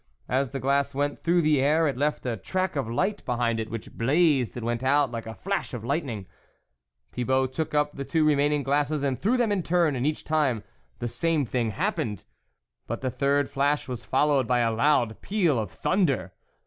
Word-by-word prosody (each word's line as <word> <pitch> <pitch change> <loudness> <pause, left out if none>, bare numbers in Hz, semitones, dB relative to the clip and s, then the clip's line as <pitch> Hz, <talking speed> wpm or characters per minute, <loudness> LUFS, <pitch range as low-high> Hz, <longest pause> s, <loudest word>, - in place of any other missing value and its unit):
As 130 +1 0
the 135 - -4
glass 140 +1 +1
went 145 +1 -1
through 170 0 +3
the 150 -3 +3
air 155 +4 +3
it 140 - -1
left 145 +2 -1
a 120 -2 -1
track 185 - -2
of 135 -5 -2
light 200 - -1
behind 120 -2 0
it, 110 0 -4
which 115 -1 -6
blazed 135 -1 +2
and 115 - -4
went 120 +1 -2
out 140 0 +3
like 115 -1 -5
a 110 - -6
flash 195 -8 -3
of 115 - -6
lightning. 125 - -2 0.9
Thibault 130 +2 +1
took 150 +3 -3
up 150 0 +2
the 140 - -5
two 160 +2 +1
remaining 145 -1 +2
glasses 145 +2 0
and 135 -2 0
threw 230 +7 +2
them 235 -3 +1
in 200 -2 +1
turn, 170 -3 +2
and 130 +3 0
each 155 - -2
time 145 -8 +1 0.3
the 120 - -3
same 160 +3 0
thing 120 -1 -1
happened, 105 0 -2 0.6
but - - -4
the 130 -1 -1
third 140 +2 +1
flash 145 +2 0
was 125 -3 -5
followed 135 -2 +2
by 125 -1 +2
a 115 -1 +2
loud 120 -2 +2
peal 175 - +1
of 105 -4 -3
thunder. 140 - 0
140 Hz, 200 wpm, -26 LUFS, 120-150 Hz, 0.9 s, through